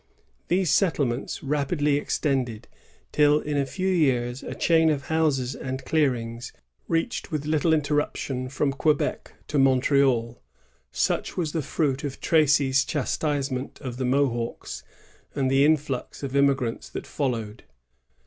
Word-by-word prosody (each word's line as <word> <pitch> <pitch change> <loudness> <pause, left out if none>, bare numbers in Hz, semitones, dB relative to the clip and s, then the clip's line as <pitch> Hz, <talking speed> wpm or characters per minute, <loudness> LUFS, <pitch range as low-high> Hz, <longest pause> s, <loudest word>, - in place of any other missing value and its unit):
These 180 -2 +2
settlements 140 - 0
rapidly 145 +1 +1
extended, 130 -6 -1 0.4
till 150 0 +4
in 150 -1 -3
a 140 -1 +1
few 185 +9 -3
years 130 -8 +1
a - - -6
chain 160 -1 +3
of 145 -3 -2
houses 145 -6 +1
and 130 0 -5
clearings 120 -6 -1 0.4
reached 165 +5 -1
with 150 -2 -2
little 155 +2 +1
interruption 145 -4 -1
from 140 +1 0
Quebec 150 +1 0
to 145 - 0
Montreal. 130 -3 +2 0.5
Such - - -1
was 165 -4 -1
the 160 - -1
fruit 140 0 -1
of 140 -2 -5
Tracy's 145 -4 +3
chastisement 140 -2 -2
of 125 -2 -6
the 130 - -2
Mohawks, 125 -3 -1 0.5
and 135 -2 0
the 135 +1 +4
influx 145 -4 0
of 135 -1 -4
immigrants 135 -4 +1
that - - -6
followed. 120 -6 -3
140 Hz, 130 wpm, -25 LUFS, 130-150 Hz, 0.5 s, till